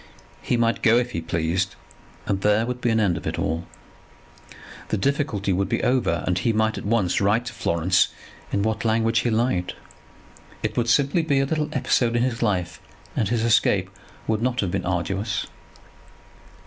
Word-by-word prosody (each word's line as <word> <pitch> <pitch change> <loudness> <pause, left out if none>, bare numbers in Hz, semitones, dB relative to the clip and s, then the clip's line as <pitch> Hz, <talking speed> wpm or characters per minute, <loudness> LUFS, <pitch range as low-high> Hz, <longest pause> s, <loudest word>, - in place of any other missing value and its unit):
He 120 - 0
might 115 0 +1
go 115 -1 +5
if 125 0 0
he 85 - -3
pleased, 85 +3 -1 0.5
and 95 -1 -1
there 105 +2 +3
would 125 +1 -4
be 120 - +1
an 115 -1 +2
end 95 -6 +2
of - - -6
it - - -2
all. 80 +2 -2 1.2
The - - -1
difficulty 110 -5 0
would 95 +2 0
be - - -1
over, 125 -10 +1
and 90 -1 0
he 115 +4 +1
might 110 0 +1
at - - -9
once 100 -6 +1
write 105 +4 +2
to 115 - -6
Florence 90 -2 +2 0.4
in 100 - 0
what 110 0 -1
language 115 0 +2
he 120 - 0
liked. 110 -6 0 0.9
It - - -2
would 120 -1 0
simply 140 +7 +3
be 145 -4 +1
a 135 - +2
little 150 +1 -1
episode 120 -4 +1
in 120 - +2
his 125 -2 -2
life, 90 -6 -1 0.3
and 105 - 0
his 115 -1 0
escape 115 -1 +2 0.3
would 110 -1 0
not 125 0 0
have 95 -4 -2
been 90 -2 -2
arduous. 95 +3 -1
110 Hz, 185 wpm, -23 LUFS, 95-120 Hz, 1.2 s, go